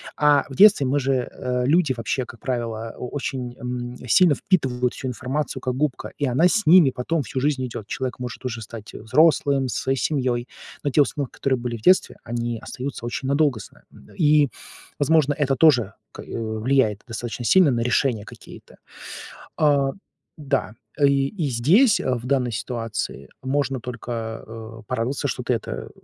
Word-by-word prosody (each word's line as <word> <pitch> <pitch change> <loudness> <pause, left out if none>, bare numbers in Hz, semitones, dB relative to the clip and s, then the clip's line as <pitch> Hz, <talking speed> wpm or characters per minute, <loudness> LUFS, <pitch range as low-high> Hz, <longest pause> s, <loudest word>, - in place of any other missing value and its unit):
А 145 -2 +4
в 135 - -8
детстве 200 -8 +6
мы 140 +3 +1
же, 135 +1 0 0.2
э, 125 -1 -2
люди 155 -1 +3
вообще, 120 +3 -2
как 120 -2 -13
правило, 115 -3 -3
очень, 125 -1 -4
м, 125 -1 -5
сильно 165 +3 +5
впитывают 125 -9 0
всю 130 - -6
информацию, 130 +4 -3
как 130 -1 -1
губка, 145 0 -2
и 145 - +1
она 135 +8 +4
с 210 0 0
ними 165 -5 +7
потом 145 +5 -2
всю 130 +4 -4
жизнь 135 -2 0
идет. 115 -3 -7
Человек 130 -2 -4
может 125 +1 -7
уже 115 -2 -3
стать 110 0 -10
взрослым, 140 +2 +2
со - - -2
своей 135 0 0
семьей. 125 -4 -1 0.4
Но 145 - 0
те 150 - +4
установки, 140 -2 -1
которые 130 -2 0
были 120 -1 -4
в - - -15
детстве, 185 +7 +3
они 120 -1 -3
остаются 130 -2 -6
очень 130 +2 -4
надолго 140 -4 +2
с - - -11
нами, - - -23
м. - - -17
И, 150 -3 +4 0.5
возможно, 145 0 +3
это 140 -2 0
тоже 125 -10 +4 0.2
к - - -10
э, - - -12
влияет 110 0 0
достаточно 115 0 -5
сильно 180 -3 +5
на 120 - 0
решения 120 -2 +1
какие-то. - - -13 0.8
А, 140 -3 +3 0.5
да, 135 -6 -1 0.3
и 140 -1 +3
и 160 -5 -3
здесь, 190 - +4
э, 130 - 0
в 120 0 -6
данной 125 -3 +1
ситуации, 115 - -4
можно 135 -1 -1
только, 115 -2 -5
э, 115 0 -10
порадоваться, 130 +3 -2
что 125 - -3
ты 125 - 0
это, 115 - -5
130 Hz, 175 wpm, -23 LUFS, 120-145 Hz, 0.8 s, ними